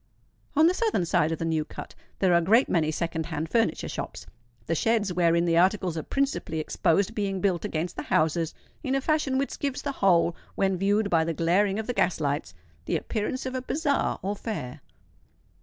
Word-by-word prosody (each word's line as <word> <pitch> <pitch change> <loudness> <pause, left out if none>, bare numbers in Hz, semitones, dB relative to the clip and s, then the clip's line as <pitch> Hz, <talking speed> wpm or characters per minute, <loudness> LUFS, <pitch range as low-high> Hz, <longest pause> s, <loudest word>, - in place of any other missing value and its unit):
On 310 +2 +6
the 345 - +5
southern 430 - 0
side 160 -1 +2
of 165 - -1
the 165 - -3
New 160 -1 0
Cut - - -9 0.2
there 185 -2 +3
are - - +6
a - - -1
great 225 +10 +4
many 160 -3 +1
second 160 0 -2
hand 160 -1 -3
furniture 225 -8 +1
shops, - - -6 0.4
the 165 - -1
sheds 210 +2 +1
wherein 170 -1 +3
the 165 -1 +2
articles 185 -2 +2
are 160 - -2
principally 275 - -2
exposed 185 +6 +1
being 200 -3 -2
built 180 -3 0
against 160 +2 -3
the - - -2
houses 160 +1 0 0.3
in 265 -2 0
a - - +2
fashion 295 -3 +1
which 275 +1 -2
gives 280 -2 -2
the 285 - -1
whole, 175 -3 +4 0.2
when 195 -1 +1
viewed 200 +3 +1
by 165 -2 +4
the 165 0 -2
glaring 195 +5 +2
of 220 - -3
the 245 - -2
gas 180 -7 +1
lights, 145 - -2 0.3
the - - 0
appearance 230 +4 -3
of 260 - -3
a 255 - -2
bazaar 285 +2 0
or 200 +2 -1
fair. 200 - -5
185 Hz, 205 wpm, -26 LUFS, 165-230 Hz, 0.4 s, On